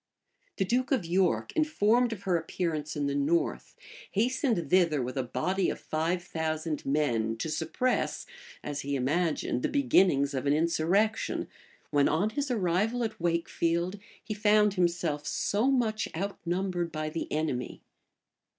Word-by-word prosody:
The 195 Hz, -, +1 dB
duke 255 Hz, +7 st, 0 dB
of 255 Hz, -10 st, +1 dB
York, 180 Hz, +1 st, +1 dB
informed 245 Hz, -6 st, +3 dB
of 205 Hz, -3 st, -6 dB
her 185 Hz, -3 st, +1 dB
appearance 160 Hz, -2 st, -2 dB
in 145 Hz, -1 st, -1 dB
the 140 Hz, -, 0 dB
north, 145 Hz, +4 st, 0 dB, 0.4 s
hastened 230 Hz, -, 0 dB
thither 170 Hz, -5 st, +4 dB
with 125 Hz, +1 st, -3 dB
a 135 Hz, -, +1 dB
body 155 Hz, +10 st, -1 dB
of -, -, -4 dB
five 165 Hz, +3 st, -1 dB
thousand 160 Hz, -2 st, -3 dB
men, 120 Hz, -6 st, +1 dB
to 160 Hz, -, -3 dB
suppress, 170 Hz, +12 st, -1 dB, 0.4 s
as 145 Hz, -1 st, -4 dB
he 140 Hz, 0 st, -2 dB
imagined, 145 Hz, 0 st, 0 dB
the -, -, 0 dB
beginnings 185 Hz, -, +3 dB
of 135 Hz, +1 st, -2 dB
an 140 Hz, -, +4 dB
insurrection; 170 Hz, +7 st, +1 dB, 0.4 s
when, 145 Hz, -1 st, +4 dB
on 190 Hz, +8 st, +1 dB
his 280 Hz, +4 st, -2 dB
arrival 215 Hz, +2 st, +1 dB
at 220 Hz, -1 st, -4 dB
Wakefield, 170 Hz, +2 st, 0 dB, 0.2 s
he 215 Hz, -, -4 dB
found 210 Hz, -1 st, +3 dB
himself 170 Hz, -5 st, 0 dB
so 215 Hz, +6 st, +1 dB
much 230 Hz, -5 st, +1 dB
outnumbered 180 Hz, -2 st, -2 dB
by 155 Hz, 0 st, -3 dB
the 165 Hz, -, -4 dB
enemy. 150 Hz, -5 st, -2 dB
170 Hz, 145 wpm, -29 LUFS, 155-210 Hz, 0.4 s, thither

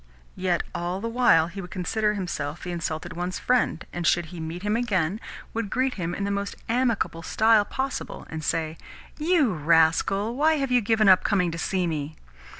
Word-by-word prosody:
Yet 180 Hz, -2 st, 0 dB
all 175 Hz, +2 st, -3 dB
the 230 Hz, -, -3 dB
while 230 Hz, -9 st, +4 dB
he 185 Hz, +4 st, -7 dB
would 180 Hz, -, -9 dB
consider 210 Hz, +3 st, 0 dB
himself 170 Hz, -5 st, -4 dB
the 180 Hz, -, -4 dB
insulted 170 Hz, 0 st, -4 dB
one's 180 Hz, +2 st, -3 dB
friend, 250 Hz, -8 st, +1 dB
and, 175 Hz, -1 st, -1 dB
should 175 Hz, -1 st, +3 dB
he 175 Hz, -, -7 dB
meet 165 Hz, +3 st, -5 dB
him 210 Hz, +1 st, +1 dB
again, 205 Hz, -5 st, 0 dB, 0.3 s
would 225 Hz, -2 st, -2 dB
greet 260 Hz, +3 st, 0 dB
him 175 Hz, -2 st, -3 dB
in 200 Hz, -, -3 dB
the 200 Hz, -, -1 dB
most 200 Hz, 0 st, -2 dB
amicable 230 Hz, -8 st, 0 dB
style 220 Hz, +4 st, +3 dB
possible, 265 Hz, +5 st, -4 dB
and 160 Hz, -1 st, -6 dB
say, 160 Hz, 0 st, -2 dB, 0.4 s
"You 305 Hz, -, +3 dB
rascal, 165 Hz, +7 st, +2 dB
why 310 Hz, +4 st, +3 dB
have 275 Hz, -3 st, -1 dB
you 250 Hz, -1 st, +4 dB
given 220 Hz, 0 st, +2 dB
up 185 Hz, -1 st, +7 dB
coming 180 Hz, -4 st, +1 dB
to 165 Hz, -, -5 dB
see 185 Hz, +1 st, 0 dB
me." 155 Hz, -2 st, -3 dB
190 Hz, 190 wpm, -25 LUFS, 170-225 Hz, 0.4 s, up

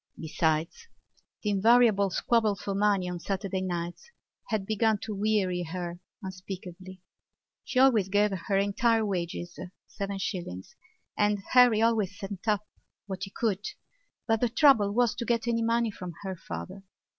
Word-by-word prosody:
Besides, 160 Hz, -, -1 dB, 0.6 s
the 210 Hz, -, +1 dB
invariable 210 Hz, -1 st, +4 dB
squabble 220 Hz, +2 st, +1 dB
for 195 Hz, +1 st, -4 dB
money 200 Hz, -2 st, +2 dB
on 180 Hz, -1 st, -4 dB
Saturday 195 Hz, +1 st, -3 dB
nights 175 Hz, -, -4 dB, 0.4 s
had 215 Hz, -3 st, -1 dB
begun 220 Hz, +1 st, +2 dB
to 220 Hz, -, -4 dB
weary 200 Hz, -3 st, 0 dB
her 175 Hz, 0 st, -5 dB, 0.2 s
unspeakably. 185 Hz, -1 st, -8 dB, 0.6 s
She 265 Hz, -, -5 dB
always 240 Hz, -7 st, +5 dB
gave 205 Hz, +1 st, +3 dB
her 195 Hz, +1 st, -1 dB
entire 220 Hz, +3 st, +2 dB
wages—seven 185 Hz, +2 st, -5 dB
shillings—and 195 Hz, -, -4 dB
Harry 245 Hz, -3 st, +6 dB
always 215 Hz, -4 st, +1 dB
sent 195 Hz, +1 st, -7 dB
up 210 Hz, -1 st, +1 dB, 0.4 s
what 190 Hz, -1 st, -5 dB
he -, -, -10 dB
could 205 Hz, -1 st, -1 dB, 0.6 s
but 225 Hz, -1 st, +1 dB
the 245 Hz, -, +2 dB
trouble 235 Hz, -6 st, +5 dB
was 235 Hz, 0 st, +2 dB
to 240 Hz, -, -4 dB
get 235 Hz, -1 st, 0 dB
any 230 Hz, -1 st, +1 dB
money 230 Hz, 0 st, +1 dB
from 180 Hz, -3 st, -8 dB
her 190 Hz, -1 st, -4 dB
father. 85 Hz, -, -7 dB
200 Hz, 140 wpm, -28 LUFS, 185-225 Hz, 0.6 s, Harry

